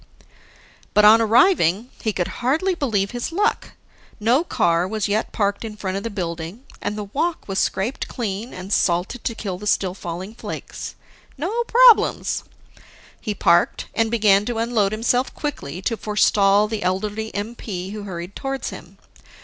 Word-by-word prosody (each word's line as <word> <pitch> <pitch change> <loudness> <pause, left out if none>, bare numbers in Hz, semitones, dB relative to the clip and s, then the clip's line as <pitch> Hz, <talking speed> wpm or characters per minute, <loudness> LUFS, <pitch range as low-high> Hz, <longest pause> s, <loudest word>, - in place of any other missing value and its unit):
But 210 - +6
on 220 +2 +8
arriving, 225 - +3
he 220 - 0
could 180 -4 -1
hardly 315 +10 +1
believe 215 - 0
his 245 +4 -4
luck. 415 +6 0 0.5
No 240 +8 +3
car 175 - +1
was 215 +1 -1
yet 210 +2 -1
parked 200 0 -1
in 215 -2 -7
front 190 -2 -3
of 195 - -2
the 230 - -4
building, 175 +3 -5 0.2
and 205 +1 -3
the 210 - -3
walk 310 - -2
was 195 -1 -1
scraped 215 +9 -1
clean 220 -1 -4
and 185 +2 -5
salted 180 +7 +1
to 230 - -2
kill 190 -5 -4
the 210 - -6
still 190 -3 +1
falling 185 +2 -6
flakes. 230 - -7 0.4
No 405 - -1
problems. 485 -1 +5 0.8
He 210 -3 -3
parked 175 -2 +2
and 225 0 +1
began 210 -3 +4
to 240 0 -3
unload 225 -3 +1
himself 245 +4 0
quickly, 185 - -5
to 230 - 0
forestall 210 -1 +3
the 215 -1 -4
elderly 210 +4 -2
MP 205 -3 -5
who 210 0 -6
hurried 180 -1 -7
towards 270 0 -3
him. - - -11
210 Hz, 160 wpm, -22 LUFS, 195-240 Hz, 0.8 s, on